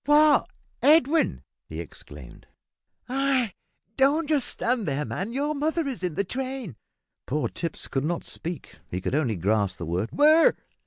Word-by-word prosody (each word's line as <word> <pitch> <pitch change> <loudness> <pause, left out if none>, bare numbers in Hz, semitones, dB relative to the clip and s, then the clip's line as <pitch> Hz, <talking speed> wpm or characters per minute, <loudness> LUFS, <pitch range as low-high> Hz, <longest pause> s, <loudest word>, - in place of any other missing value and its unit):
"What! 295 0 +5 0.3
Edwin!" 310 +1 +4 0.3
he - - -6
exclaimed. - - -11 0.6
"Ay 260 -4 +1 0.4
don't 290 +3 +3
stand 240 -3 -1
there, 145 +1 -1
man. 195 +5 -4
Your 285 +4 -1
mother 310 +2 -1
is 260 -10 -4
in 175 -4 -2
the 200 - +1
train." 255 - -4 0.5
Poor 150 +3 0
Tipps 165 -2 -5
could 135 - -1
not 170 +3 -1
speak 165 -3 -7
he 90 - -3
could 95 - -3
only 140 -7 +1
gasp 100 +1 0
the 85 - -5
word, 90 +7 -2
"Where?" 310 +3 +5
235 Hz, 150 wpm, -26 LUFS, -, 0.6 s, What